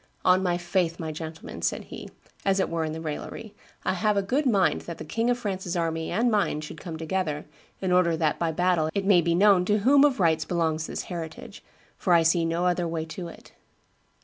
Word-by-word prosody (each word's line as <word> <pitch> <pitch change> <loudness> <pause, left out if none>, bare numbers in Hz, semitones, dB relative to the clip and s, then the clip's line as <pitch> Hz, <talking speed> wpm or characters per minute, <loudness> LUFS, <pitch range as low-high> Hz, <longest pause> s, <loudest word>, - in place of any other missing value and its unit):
'On 185 +1 +5
my 175 -2 +1
faith, 175 -1 -1
my 160 -2 -3
gentleman,' 160 +1 -8
said - - -1
he, - - -9 0.3
as 195 0 +2
it 190 - +1
were 165 -1 -1
in 155 0 -4
raillery, 165 +7 -6 0.3
'I - - +2
have 210 +2 +1
a 200 - +2
good 270 +9 0
mind 195 -9 +2
that 170 - -5
the - - -8
King 230 +9 -1
of 245 - +2
France's 190 -5 -3
army 165 -1 -1
and 235 +2 +1
mine 205 -7 +1
should 155 0 -9
come 165 -2 -6
together, 160 -2 -2 0.4
in 190 -1 -1
order 175 -2 +3
that 155 -2 0
by 170 -1 0
battle 175 -1 +1
it 200 -1 0
may 190 -3 +5
be 170 0 +1
known 195 -1 +5
to 210 +2 +2
whom 280 +2 +6
of 280 -5 +3
right 165 -3 +3
belongs 160 -2 0
this - - -4
heritage, 165 -3 -7 0.3
for 180 - +1
I 170 -1 +5
see 165 +1 +3
no 165 +2 0
other 175 -1 +1
way 165 -1 -3
to 175 +2 -7
it. 165 - -13
175 Hz, 220 wpm, -26 LUFS, 160-195 Hz, 0.4 s, whom